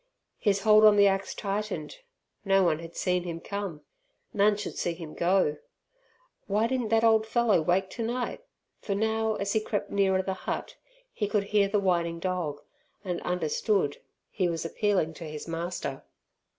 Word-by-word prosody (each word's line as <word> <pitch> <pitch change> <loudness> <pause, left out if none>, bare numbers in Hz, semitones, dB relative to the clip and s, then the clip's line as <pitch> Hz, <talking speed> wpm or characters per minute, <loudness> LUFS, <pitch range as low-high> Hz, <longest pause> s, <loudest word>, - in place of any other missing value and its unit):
His 200 -2 +1
hold 215 -1 +6
on 215 -1 +8
the 205 0 +6
axe 195 0 +1
tightened. 200 -6 -3 0.5
No 195 -1 +4
one 160 -3 +2
had 165 0 -10
seen 180 -1 0
him 170 -2 -5
come; 200 -5 -5 0.5
none 205 +1 +3
should 210 - -5
see 175 - -1
him 165 -3 -9
go! 175 -4 +2 0.9
Why 210 +3 +2
didn't 250 -1 -1
that 225 0 +3
old 220 -1 +4
fellow 225 -6 +3
wake 180 +4 +1
tonight? 240 - -3 0.4
for 200 - -3
now, 220 +1 0
as 200 -1 -2
he 220 - +3
crept 205 -1 -3
nearer 190 -1 +2
the 190 - -2
hut, 190 - -5 0.4
he 210 - -1
could 205 -1 +1
hear 200 0 +2
the 205 +1 +1
whining 170 -3 +1
dog, 170 -5 -2 0.4
and 180 -2 -2
understood, 180 -1 0 0.3
he 185 -3 0
was 165 -1 -3
appealing 185 -2 0
to 165 - -9
his 150 +1 -7
master. 165 -4 -4
195 Hz, 165 wpm, -28 LUFS, 170-210 Hz, 0.9 s, on